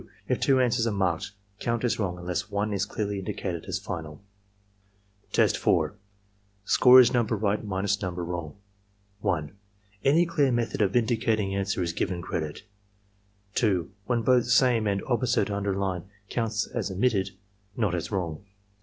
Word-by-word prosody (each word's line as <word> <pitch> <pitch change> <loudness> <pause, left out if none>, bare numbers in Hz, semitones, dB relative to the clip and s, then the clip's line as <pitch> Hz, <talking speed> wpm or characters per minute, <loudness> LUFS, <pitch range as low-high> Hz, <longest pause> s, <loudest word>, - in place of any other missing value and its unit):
If - - 0
two 135 -1 +3
answers 120 -2 +2
are - - +1
marked, 95 -5 0 0.3
count 120 0 -1
as 120 -2 0
wrong 90 -4 -1
unless 90 0 -3
one 105 +1 -1
is 100 +1 -1
clearly 105 -2 -3
indicated 95 -4 -4
as - - -2
final 75 -2 -6 1.1
Test - - +3
4 - - +2 0.7
(Score 125 +4 +7
is 125 0 +6
number 120 -2 +1
right 105 +1 0
minus 100 0 -1
number 90 -2 -3
wrong.) 85 -3 -5 0.6
1. 80 -7 -1 0.5
Any 155 +6 +4
clear 150 -5 +2
method 115 -2 -1
of 100 -2 +1
indicating 110 -4 +1
answer 100 -1 -1
is 85 -1 -2
given 90 +1 -2
credit. 80 -5 -4 0.9
2. 95 -7 +1 0.2
When 120 -2 +1
both 125 0 +3
"Same 120 -2 +4
and 100 -1 0
"Opposite" 120 -3 +1
are 100 - -1
underlined, 95 -3 -2 0.3
counts 115 -3 -1
as - - -3
omittedf 100 0 +1 0.5
not 105 -7 +1
as 90 +3 -3
wrong. 90 -3 -3
100 Hz, 155 wpm, -27 LUFS, 90-115 Hz, 1.1 s, Score